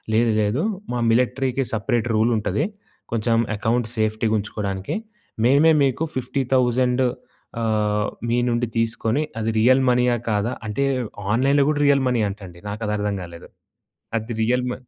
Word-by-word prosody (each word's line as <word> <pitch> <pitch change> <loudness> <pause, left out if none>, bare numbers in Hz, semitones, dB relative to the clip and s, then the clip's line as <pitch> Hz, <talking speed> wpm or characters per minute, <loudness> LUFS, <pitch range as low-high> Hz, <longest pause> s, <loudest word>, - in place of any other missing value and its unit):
"లేదు, 115 0 +3
లేదు. 105 +9 0 0.3
మా 120 - -1
మిలిటరీకి 130 +2 +1
సెపరేట్ 115 +2 0
రూల్ 115 +2 +3
ఉంటది. 105 - -1 0.5
కొంచెం 115 0 +1 0.2
అకౌంట్ 110 +2 0
సేఫ్టీగా 110 0 0
ఉంచుకోవడానికి. 100 -2 -4 0.5
మేమే 145 +5 +5
మీకు 135 +3 +1
50,000 130 -1 +1 0.6
ఆహ్, 105 -2 +1 0.2
మీ 120 - +2
నుండి 120 0 0
తీసుకొని, 115 +4 0 0.2
అది 110 0 -1
రియల్ 130 +4 +5
మనీయా 125 -1 +3
కాదా" 105 +4 0
అంటే, 140 +7 0 0.5
ఆన్‌లైన్‌లో 140 +4 +3
కూడా 150 -1 0
రియల్ 140 -1 +4
మనీ 120 -2 +1
అంటండి. 95 -4 -10
నాకది 105 +1 -3
అర్థం 105 0 -1
కాలేదు. 85 -1 -11 0.7
అది 110 +2 -4
రియల్ 125 +3 +1
మ - - -2
115 Hz, 135 wpm, -22 LUFS, 105-125 Hz, 0.7 s, మేమే